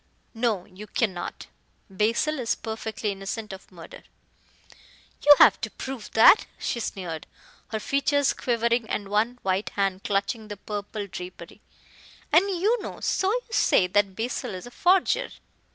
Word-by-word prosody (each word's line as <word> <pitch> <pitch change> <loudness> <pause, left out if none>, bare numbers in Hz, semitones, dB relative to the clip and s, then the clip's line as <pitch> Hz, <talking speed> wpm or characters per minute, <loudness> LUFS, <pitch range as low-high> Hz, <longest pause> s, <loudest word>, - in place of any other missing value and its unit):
"No, 225 -5 0
you 200 +3 -12
cannot. 190 -7 -2 0.4
Basil 225 +10 0
is 235 -2 0
perfectly 220 -1 -4
innocent 200 +2 -5
of 190 - -12
murder." 170 -3 -12 1.2
"You 290 0 +9
have - - +6
to - - -2
prove 260 -5 -7
that," 225 - +7
she 240 - -3
sneered, 175 -7 -5 0.4
her 220 - -3
features 280 +3 +1
quivering 235 -1 0
and 200 -1 -3
one 220 +4 +1
white 190 +2 0
hand 195 -1 0
clutching 205 +2 -1
the 205 -1 -7
purple 205 +1 -5
drapery, 180 -1 -9 0.7
"and 350 +7 +5
you 405 +5 +1
know - - -7
so 380 +1 +1
you - - 0
say, 190 - +4
that 195 +1 +1
Basil 225 -3 -3
is 185 - -8
a 245 - -10
forger." 375 - +2
220 Hz, 145 wpm, -26 LUFS, 195-250 Hz, 1.2 s, You